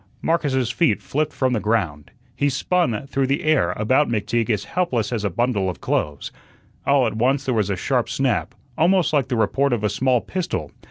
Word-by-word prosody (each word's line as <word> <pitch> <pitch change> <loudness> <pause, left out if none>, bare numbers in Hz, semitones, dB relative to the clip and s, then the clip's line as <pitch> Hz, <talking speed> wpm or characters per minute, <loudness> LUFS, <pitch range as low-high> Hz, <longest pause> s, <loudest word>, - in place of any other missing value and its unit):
Marcus's 135 -7 +1
feet 165 +5 +2
flipped 155 +2 -2
from 130 -2 0
the 115 - +1
ground, 90 -10 -1 0.3
he 145 - +1
spun 135 - 0
through 135 -1 -1
the 140 +2 0
air 150 - +2
about 130 +9 +2
McTeague 115 +1 -1
as 105 -3 0
helpless 125 - -1
as 110 -3 -2
a 100 - +1
bundle 100 -1 0
of 90 - -6
clothes. 75 -2 -2 0.6
All 140 -2 +4
at 115 - -1
once 135 +4 +1
there 130 - 0
was 105 -4 0
a 100 - 0
sharp - - 0
snap, - - -1 0.2
almost 180 0 +3
like 140 -4 +2
the 130 - -1
report 130 +5 +1
of 110 -3 -1
a 105 - +2
small 125 +4 +2
pistol. 165 - -4
125 Hz, 200 wpm, -22 LUFS, 105-140 Hz, 0.6 s, All